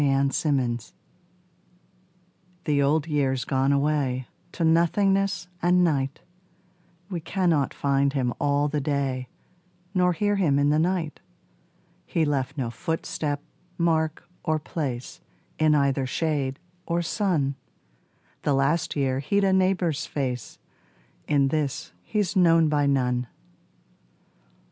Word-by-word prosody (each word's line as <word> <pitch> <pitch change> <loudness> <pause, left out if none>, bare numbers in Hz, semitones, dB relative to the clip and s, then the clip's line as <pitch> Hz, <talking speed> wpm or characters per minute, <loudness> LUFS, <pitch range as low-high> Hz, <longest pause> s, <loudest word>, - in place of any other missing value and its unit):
The 140 -1 +3
Old 135 0 +1
Year 130 -6 +1 1.9
The 145 -2 +2
Old 145 +2 +2
Year's 135 -5 0
gone 135 +1 +1
away 140 -3 +1 0.3
To 170 - -2
nothingness 180 +3 +2
and 180 +1 +4
night: 140 -4 0 0.9
We 175 - -2
cannot 165 -4 +1
find 140 0 +1
him 125 -4 0
all 145 0 +2
the 150 0 -1
day 135 -3 -1 0.7
Nor 180 -2 +3
hear 205 +4 +1
him 155 -8 +2
in 145 +1 +3
the 150 - +3
night: 170 -2 -1 0.9
He 165 - +1
left 140 -1 -1
no 120 -4 -2
footstep, 150 - -3 0.3
mark 160 -1 0 0.2
or 155 -1 +1
place 140 -5 -5 0.4
In 155 -1 +4
either 140 -2 +1
shade 140 -2 -1 0.3
or 170 0 0
sun: 165 -7 0 0.9
The 145 - +1
last 140 +5 +1
year 135 -2 0
he'd 200 +9 +1
a 190 -1 +3
neighbour's 185 -5 +1
face, 125 -4 -3 0.7
In 140 -2 +3
this 145 -2 -2
he's 210 -2 -1
known 165 -3 +5
by 145 -1 +2
none. 125 -3 +1
150 Hz, 120 wpm, -25 LUFS, 135-170 Hz, 1.9 s, known